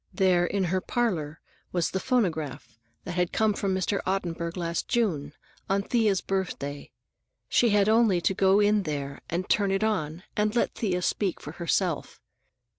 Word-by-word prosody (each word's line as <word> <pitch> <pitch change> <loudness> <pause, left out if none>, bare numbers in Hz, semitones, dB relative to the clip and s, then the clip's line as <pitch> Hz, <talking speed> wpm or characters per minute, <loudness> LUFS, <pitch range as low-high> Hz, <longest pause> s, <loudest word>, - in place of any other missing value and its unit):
There, 180 -3 +3
in 195 +1 0
her 185 +1 0
parlor, 175 -13 -1 0.3
was 175 -2 0
the 190 - -1
phonograph 165 - -1 0.2
that - - -5
had 180 0 0
come 220 -1 +2
from 195 -1 -1
Mr. 190 +2 0
Ottenburg 170 -2 -2
last 170 -1 -2
June, 165 - 0 0.4
on 195 +1 +1
Thea's 215 -4 +2
birthday; 160 -7 -3 0.6
she 240 - +3
had 205 -1 +3
only 220 -4 +4
to 195 - +2
go 190 +1 +4
in 210 0 +4
there 140 -5 -4
and 175 +2 -2
turn 200 -2 +2
it 195 +2 +1
on, 180 -6 -1
and 210 +1 +1
let 240 - +1
Thea 180 -5 -1
speak 195 -1 0
for 150 - -8
herself. 170 0 -1
190 Hz, 165 wpm, -27 LUFS, 170-205 Hz, 0.6 s, only